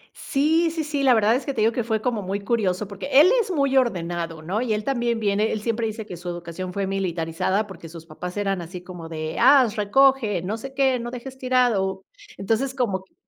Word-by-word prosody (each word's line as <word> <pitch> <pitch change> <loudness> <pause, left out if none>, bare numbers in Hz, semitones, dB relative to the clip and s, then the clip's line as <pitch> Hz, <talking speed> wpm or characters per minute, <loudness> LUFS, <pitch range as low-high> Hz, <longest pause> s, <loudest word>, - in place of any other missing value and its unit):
Sí, 320 +4 +1
sí, 325 0 -3
sí, 295 -2 -2
la 260 -3 +5
verdad 220 0 +4
es 260 - -2
que 280 - -4
te 220 - 0
digo 225 +2 +3
que 240 - -1
fue 220 -1 -1
como 230 -1 -1
muy 195 +1 -3
curioso 200 -2 0
porque 200 +3 -7
él 345 +7 +7
es 405 - -5
muy 275 -6 +1
ordenado, 170 -8 -1
¿no?, 195 +8 -2
y 235 -3 0
él 210 - -3
también 240 -2 0
viene 210 0 +1
él 215 - -2
siempre 230 0 -1
dice 220 0 -6
que 180 -4 -8
su 175 +1 -7
educación 175 +1 -6
fue 200 +1 -2
militarizada 190 +1 -1
porque 170 -5 -11
sus 165 0 -11
papás 180 +4 -7
eran 195 -3 -1
así 175 +2 -8
como 180 -3 -9
de: 155 -1 -5
"¡Ah, 260 +1 +7
recoge! 220 -2 +3
¡No 205 +5 -3
sé 270 +3 -9
qué, 265 -2 +2
no 235 - -5
dejes 255 +2 -8
tirado!". 225 -7 +1 0.3
Entonces, 225 +7 -1
como 200 -8 -1
que 190 - -31
215 Hz, 225 wpm, -23 LUFS, 185-255 Hz, 0.3 s, él